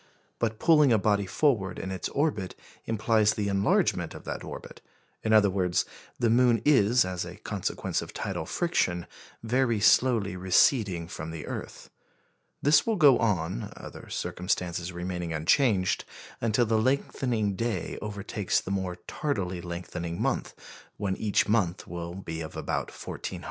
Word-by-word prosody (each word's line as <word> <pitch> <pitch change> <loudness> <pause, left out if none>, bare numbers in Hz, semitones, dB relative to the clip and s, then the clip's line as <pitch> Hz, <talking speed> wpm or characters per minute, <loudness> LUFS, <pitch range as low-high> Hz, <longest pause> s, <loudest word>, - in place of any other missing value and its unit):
But 110 -2 -1
pulling 150 -3 +5
a 115 - +5
body 100 -1 +1
forward 100 -9 +1
in 95 - -5
its 95 -2 -3
orbit 140 -11 -1 0.3
implies 110 -1 +2
the 105 -1 -1
enlargement 100 0 +1
of - - -10
that - - -5
orbit; - - -9 0.4
in 110 - -1
other 105 -3 +6
words, 90 -2 +1 0.3
the 115 -2 +2
moon 120 -1 +4
is, 125 -6 +5
as 90 -1 -3
a - - -8
consequence - - -3
of - - -8
tidal 80 - -4
friction, 90 - 0 0.4
very 120 -1 +1
slowly 110 -3 +4
receding 95 -1 +3
from 80 -3 -6
the 80 -1 -6
earth. - - -7 0.7
This 145 +8 +5
will 225 - +2
go 145 -8 +6
on 95 - -1
(other - - -10
circumstances 90 -1 -2
remaining 90 -1 -4
unchanged) 90 - +2 0.4
until 115 +1 +2
the 110 0 +2
lengthening 120 -5 0
day 115 -5 -2
overtakes 100 -1 -1
the 95 - -6
more 95 -2 -2
tardily 95 - -2
lengthening 85 -1 -5
month, - - -1 0.4
when 100 -2 -1
each 105 0 +1
will 90 -4 -1
be 80 -4 -6
of 80 - -7
about - - -2
1,400 - - -10
hours. - - -5
100 Hz, 150 wpm, -28 LUFS, 90-115 Hz, 0.7 s, other